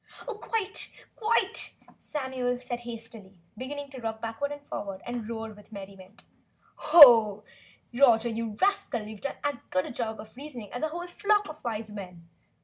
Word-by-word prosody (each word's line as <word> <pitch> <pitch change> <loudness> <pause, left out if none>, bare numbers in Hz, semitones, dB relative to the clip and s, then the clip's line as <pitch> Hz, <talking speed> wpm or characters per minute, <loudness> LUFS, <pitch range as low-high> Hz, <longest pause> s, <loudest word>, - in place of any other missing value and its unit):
"Oh, - - -2
quite! 425 -1 -2 0.3
Quite!" 450 0 +1 0.2
Samuel 260 -3 -2 1.0
began 285 +2 -5
to 260 -3 -8
rock 220 -1 -3
backward 230 +6 -3
and 290 0 -8
forward 195 -2 -5
and 240 -2 -4
roar 225 -1 -4
with 210 +1 -17
merriment. 195 0 -11 1.7
"Roger, 240 -3 +5
you 225 -2 -3
rascal, 395 - +1
you've 215 -1 -9
done 280 - -3
as 290 -3 0
good 185 0 +1
a - - -6
job 225 -2 -3
of 215 +2 -11
reasoning 255 -6 -8
as 245 - -4
a 315 - +1
whole 345 +3 -5
flock 415 +3 +1
of 310 0 -10
Wise 220 -2 -3
Men! 180 -5 -9
240 Hz, 150 wpm, -28 LUFS, 215-290 Hz, 1.7 s, Roger